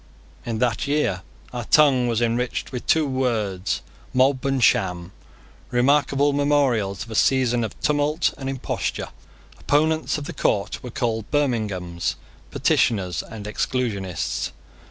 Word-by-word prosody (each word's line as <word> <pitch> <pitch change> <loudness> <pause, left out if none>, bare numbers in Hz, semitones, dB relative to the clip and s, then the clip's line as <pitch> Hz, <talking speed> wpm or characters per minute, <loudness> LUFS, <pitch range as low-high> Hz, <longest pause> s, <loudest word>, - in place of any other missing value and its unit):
In 115 -2 -1
that 125 +4 0
year 140 -11 +1 0.3
our 120 -2 -4
tongue 135 -4 +5
was 120 0 +1
enriched 120 +1 -1
with 125 -2 -6
two 160 -1 +4
words, 110 -9 -1 0.3
Mob 130 +1 +3
and 135 -2 +1
Sham, 90 -3 +2 0.6
remarkable 140 +3 +3
memorials 135 -9 +1
of 115 - -12
a - - -4
season 125 0 +2
of 110 - -6
tumult 150 +1 +1
and 135 -1 -5
imposture. 135 -2 -3 0.5
Opponents 155 +2 +1
of 150 - -5
the 170 - -6
court 100 -8 0
were 125 - -7
called 110 -2 -2
Birminghams, 105 - -1 0.3
Petitioners, 90 -6 +1
and 110 -3 -9
Exclusionists. 105 -6 -2
125 Hz, 130 wpm, -23 LUFS, 105-140 Hz, 0.6 s, tongue